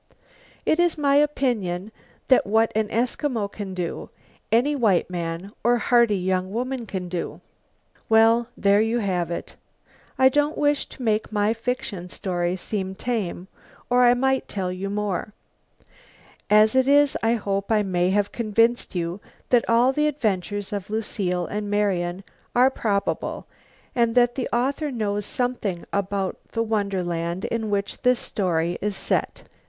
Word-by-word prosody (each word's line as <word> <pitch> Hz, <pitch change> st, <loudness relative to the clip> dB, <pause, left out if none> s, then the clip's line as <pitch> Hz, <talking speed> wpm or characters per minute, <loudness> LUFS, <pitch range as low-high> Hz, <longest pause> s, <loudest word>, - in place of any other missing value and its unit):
It 315 Hz, -, +2 dB
is 345 Hz, -2 st, +2 dB
my 285 Hz, -1 st, +3 dB
opinion 220 Hz, -10 st, 0 dB, 0.4 s
that 260 Hz, -, +4 dB
what 225 Hz, +2 st, +3 dB
an 220 Hz, -1 st, +1 dB
Eskimo 230 Hz, -1 st, -1 dB
can 195 Hz, -3 st, -6 dB
do, 175 Hz, -2 st, -4 dB, 0.4 s
any 250 Hz, +6 st, +3 dB
white 205 Hz, -9 st, +2 dB
man 170 Hz, +2 st, -4 dB
or 240 Hz, +2 st, +4 dB
hearty 235 Hz, -2 st, +3 dB
young 185 Hz, 0 st, -1 dB
woman 245 Hz, +1 st, -3 dB
can 185 Hz, -2 st, -4 dB
do. 175 Hz, -1 st, -4 dB, 0.7 s
Well, 225 Hz, +1 st, +5 dB
there 200 Hz, +1 st, +4 dB
you 225 Hz, +2 st, +1 dB
have 185 Hz, -6 st, -1 dB
it. 170 Hz, -, -5 dB, 0.6 s
I 260 Hz, -, +6 dB
don't 290 Hz, +3 st, +1 dB
wish 290 Hz, -1 st, +1 dB
to 255 Hz, -, -10 dB
make 220 Hz, -1 st, 0 dB
my 210 Hz, +1 st, +2 dB
fiction 225 Hz, -6 st, -4 dB
story 175 Hz, -1 st, -2 dB
seem 190 Hz, 0 st, -4 dB
tame, 195 Hz, -6 st, -3 dB, 0.4 s
or 250 Hz, 0 st, +5 dB
I 245 Hz, 0 st, +6 dB
might 265 Hz, +1 st, +1 dB
tell 185 Hz, -3 st, -3 dB
you 190 Hz, +2 st, -4 dB
more. 205 Hz, 0 st, -2 dB, 1.2 s
As 215 Hz, +1 st, +5 dB
it 260 Hz, 0 st, +3 dB
is 285 Hz, 0 st, +4 dB
I 225 Hz, +1 st, +2 dB
hope 200 Hz, -1 st, -2 dB
I 215 Hz, -1 st, +3 dB
may 180 Hz, -2 st, +1 dB
have 205 Hz, +1 st, +1 dB
convinced 230 Hz, 0 st, +1 dB
you 175 Hz, +3 st, -3 dB, 0.3 s
that 245 Hz, -2 st, +3 dB
all 240 Hz, +3 st, +4 dB
the 300 Hz, +2 st, +2 dB
adventures 205 Hz, -6 st, -2 dB
of 200 Hz, -1 st, -4 dB
Lucile 195 Hz, -5 st, -2 dB
and 205 Hz, +2 st, -4 dB
Marian 190 Hz, -3 st, 0 dB, 0.3 s
are 255 Hz, +2 st, +5 dB
probable 205 Hz, -6 st, -2 dB, 0.5 s
and 235 Hz, -1 st, +1 dB
that 245 Hz, -1 st, +4 dB
the 255 Hz, -, -3 dB
author 275 Hz, +5 st, 0 dB
knows 210 Hz, -5 st, -2 dB
something 240 Hz, -8 st, -2 dB
about 200 Hz, -1 st, -1 dB
the 230 Hz, -, +1 dB
wonderland 185 Hz, -5 st, -2 dB
in 225 Hz, -2 st, -2 dB
which 200 Hz, -1 st, -2 dB
the 250 Hz, -1 st, +4 dB
story 175 Hz, -7 st, -1 dB
is 205 Hz, -1 st, -2 dB
set. -, -, -1 dB
210 Hz, 150 wpm, -24 LUFS, 190-240 Hz, 1.2 s, I